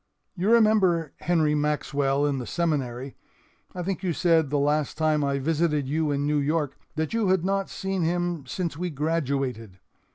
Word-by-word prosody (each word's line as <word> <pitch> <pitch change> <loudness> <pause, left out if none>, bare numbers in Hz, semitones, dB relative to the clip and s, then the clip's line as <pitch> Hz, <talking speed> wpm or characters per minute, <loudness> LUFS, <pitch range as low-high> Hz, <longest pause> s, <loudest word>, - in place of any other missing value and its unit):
"You 190 +3 0
remember 200 -9 +3
Henry 155 -2 +1
Maxwell 145 -1 0
in 140 -2 0
the 125 - -6
Seminary. 135 -6 -2 0.6
I 180 - -3
think 190 0 -3
you 180 -3 -1
said 165 -2 +2
the 145 - 0
last 145 +1 0
time 155 -1 +2
I 140 0 0
visited 150 0 0
you 155 +2 0
in 145 0 0
New 150 0 +1
York 150 0 0 0.2
that 160 +3 -2
you 225 -3 +1
had 185 -2 +2
not 195 0 0
seen 190 -1 -3
him 170 -3 -1
since 170 +4 -3
we 180 +3 -3
graduated. 135 - -2
155 Hz, 170 wpm, -26 LUFS, 140-175 Hz, 0.6 s, remember